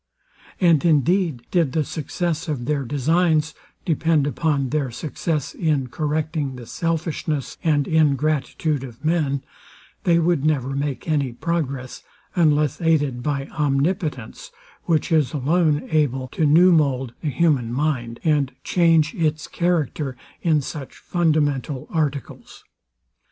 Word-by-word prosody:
And 170 Hz, -6 st, +4 dB
indeed, 165 Hz, -3 st, +2 dB
did 165 Hz, -7 st, +2 dB
the 155 Hz, -, +1 dB
success 165 Hz, +3 st, -3 dB
of 140 Hz, -6 st, -3 dB
their 145 Hz, +1 st, 0 dB
designs 155 Hz, +4 st, +1 dB, 0.3 s
depend 160 Hz, -3 st, +2 dB
upon 145 Hz, -2 st, 0 dB
their 145 Hz, -2 st, -1 dB
success 150 Hz, +3 st, -3 dB
in 145 Hz, -6 st, 0 dB
correcting 150 Hz, -1 st, -2 dB
the 125 Hz, -1 st, -9 dB
selfishness 160 Hz, -1 st, -3 dB
and 145 Hz, -4 st, +2 dB
ingratitude 155 Hz, -1 st, +1 dB
of 125 Hz, +2 st, -10 dB
men, 150 Hz, -4 st, +1 dB, 0.6 s
they 170 Hz, -1 st, +4 dB
would 170 Hz, -3 st, +2 dB
never 145 Hz, -4 st, +1 dB
make 140 Hz, +1 st, -3 dB
any 140 Hz, -6 st, 0 dB
progress, 135 Hz, -3 st, -3 dB, 0.3 s
unless 150 Hz, -3 st, +2 dB
aided 145 Hz, -7 st, +1 dB
by 140 Hz, 0 st, -2 dB
omnipotence, 145 Hz, -, -1 dB, 0.4 s
which 165 Hz, -2 st, +1 dB
is 150 Hz, -6 st, +2 dB
alone 150 Hz, +2 st, +1 dB
able 135 Hz, -4 st, +1 dB
to 155 Hz, +3 st, +1 dB
new 175 Hz, +5 st, +6 dB
mould 135 Hz, -6 st, +1 dB
the 155 Hz, -, -1 dB
human 135 Hz, -4 st, +1 dB
mind, 125 Hz, -4 st, -1 dB
and 145 Hz, -5 st, +1 dB
change 165 Hz, -3 st, +3 dB
its 155 Hz, -1 st, -1 dB
character 155 Hz, -6 st, -1 dB, 0.2 s
in 155 Hz, -3 st, +2 dB
such 140 Hz, 0 st, -7 dB
fundamental 150 Hz, -5 st, 0 dB
articles. 150 Hz, -5 st, -3 dB
150 Hz, 125 wpm, -22 LUFS, 135-160 Hz, 0.6 s, new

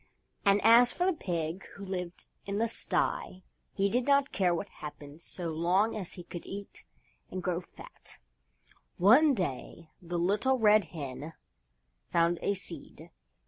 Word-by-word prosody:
And 200 Hz, 0 st, +5 dB
as 235 Hz, +3 st, +7 dB
for 360 Hz, -, -1 dB
the 380 Hz, -, +3 dB
pig 175 Hz, -, -3 dB
who 200 Hz, -, -8 dB
lived 180 Hz, -2 st, -5 dB, 0.2 s
in 200 Hz, 0 st, -2 dB
the 230 Hz, +2 st, +2 dB
sty 185 Hz, -4 st, -1 dB, 0.3 s
he 195 Hz, -1 st, +1 dB
did 245 Hz, +5 st, 0 dB
not 280 Hz, -1 st, +3 dB
care 185 Hz, -4 st, +2 dB
what 170 Hz, +4 st, -2 dB
happened 150 Hz, -2 st, -10 dB
so 175 Hz, -2 st, -5 dB
long 180 Hz, +8 st, +2 dB
as 195 Hz, -5 st, -5 dB
he 175 Hz, -, -8 dB
could 175 Hz, 0 st, -8 dB
eat 200 Hz, +1 st, -8 dB, 0.5 s
and 185 Hz, -1 st, -5 dB
grow 175 Hz, -1 st, 0 dB
fat. -, -, -12 dB, 0.8 s
One 260 Hz, -, +6 dB
day 165 Hz, -, -4 dB
the 175 Hz, 0 st, -4 dB
Little 205 Hz, +10 st, +2 dB
Red 215 Hz, -3 st, +5 dB
Hen 150 Hz, -1 st, -7 dB, 0.8 s
found 170 Hz, 0 st, +2 dB
a 200 Hz, -, +1 dB
Seed. 190 Hz, -, -8 dB
185 Hz, 150 wpm, -30 LUFS, 170-215 Hz, 0.8 s, as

